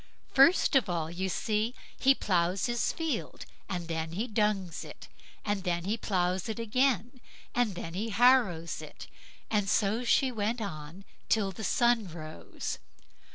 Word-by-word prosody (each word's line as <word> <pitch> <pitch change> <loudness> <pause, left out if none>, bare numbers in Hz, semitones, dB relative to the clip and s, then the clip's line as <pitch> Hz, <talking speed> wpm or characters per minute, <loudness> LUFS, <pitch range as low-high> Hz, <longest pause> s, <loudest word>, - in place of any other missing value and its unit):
"First 275 +4 +5
of 255 -8 +4
all, 165 -2 -2
you 190 +2 -2
see, 215 +5 -1 0.2
he 270 0 +4
ploughs 180 -3 +1
his 240 -1 0
field, 325 -2 -3 0.2
and 175 -3 -3
then 160 -1 -3
he 210 +7 -1
dungs 210 -6 -1
it, - - -11 0.4
and 205 -2 -1
then 175 -2 -1
he 200 +5 0
ploughs 185 -2 -1
it 220 - -3
again, 245 +1 0 0.3
and 240 -6 +1
then 165 -1 -6
he 210 +5 -2
harrows 220 -7 +3
it"; - - -10 0.5
and 205 -3 +1
so 215 +4 +2
she 260 +2 +3
went 225 +1 -1
on 175 -2 -7 0.2
till 205 -3 +2
the 205 +4 -8
sun 235 -2 +2
rose. 155 -2 -6
205 Hz, 155 wpm, -30 LUFS, 175-235 Hz, 0.5 s, First